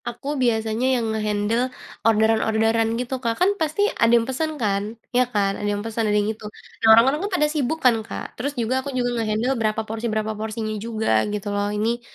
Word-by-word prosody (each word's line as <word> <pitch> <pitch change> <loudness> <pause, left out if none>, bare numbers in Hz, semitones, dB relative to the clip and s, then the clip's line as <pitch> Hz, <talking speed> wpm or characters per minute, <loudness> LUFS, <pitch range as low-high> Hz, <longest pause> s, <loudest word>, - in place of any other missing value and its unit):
Aku 270 +5 -5
biasanya 230 +2 +1
yang 235 - -1
nge-handle 215 +3 0 0.3
orderan-orderan 225 +1 +2
gitu 250 +1 -3
Kak 230 -2 -1
kan 365 - +3
pasti 315 +6 +1 0.2
ada 230 - +5
yang 230 - +1
pesen 305 +5 -2
kan 200 -5 0 0.3
iya 250 +1 +4
kan 200 -2 +1
ada 205 - -1
yang 205 +1 -4
pesen 225 -1 -1
ada 210 - +2
yang 205 - +2
itu 215 0 -13 0.4
nah 225 - +4
orang-orang 265 +6 +4
kan 405 - -2
pada 300 - +3
sibuk 300 +1 0
kan 245 -2 +6
Kak 220 - -7
terus 280 +3 -4
juga 255 +3 0
aku 280 - -6
juga 245 -1 +1
nge-handle 220 +4 0
berapa 215 0 0
porsi 225 +2 -3
berapa 215 0 -1
porsinya 215 0 -3
juga 220 -1 -2 0.2
gitu 205 0 -4
loh 205 0 0
ini, 230 +3 0
225 Hz, 205 wpm, -23 LUFS, 215-250 Hz, 0.4 s, kan